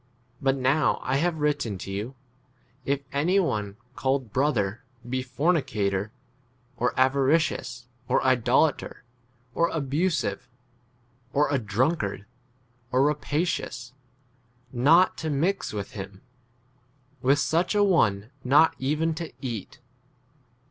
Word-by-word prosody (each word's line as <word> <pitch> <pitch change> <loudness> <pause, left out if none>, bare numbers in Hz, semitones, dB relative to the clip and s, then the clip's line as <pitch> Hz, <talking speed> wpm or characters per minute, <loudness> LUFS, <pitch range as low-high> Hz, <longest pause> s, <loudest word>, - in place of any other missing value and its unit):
But 135 0 +2
now 135 +2 +2
I 130 +1 0
have 165 +2 0
written 145 -9 0
to 95 - -7
you, 105 +7 -4 0.7
if 140 0 0
any 170 +8 +2
one 105 - -1 0.2
called 130 -5 -1
brother 120 -6 0 0.2
be 130 +1 -1
fornicator, 110 - 0 0.6
or 125 +1 -1
avaricious, 135 -1 +1 0.2
or - - +3
idolater, 130 +3 +2 0.5
or 170 +4 +2
abusive, 145 - -1 0.8
or 145 0 +2
a 140 - +2
drunkard, 105 -1 -1 0.7
or 130 +1 +3
rapacious, 145 -4 -2 0.8
not 155 +9 +4
to 160 - -3
mix 170 +8 0
with 100 -2 -5
[him]; 95 -1 -8 1.0
with 135 +3 +4
such 165 +7 +1
a 205 - +4
one 115 - +3 0.2
12 - - -30
not 145 +5 +5
even 155 +4 0
to 165 0 -6
eat. 115 -8 -6
135 Hz, 115 wpm, -26 LUFS, 120-155 Hz, 1.0 s, not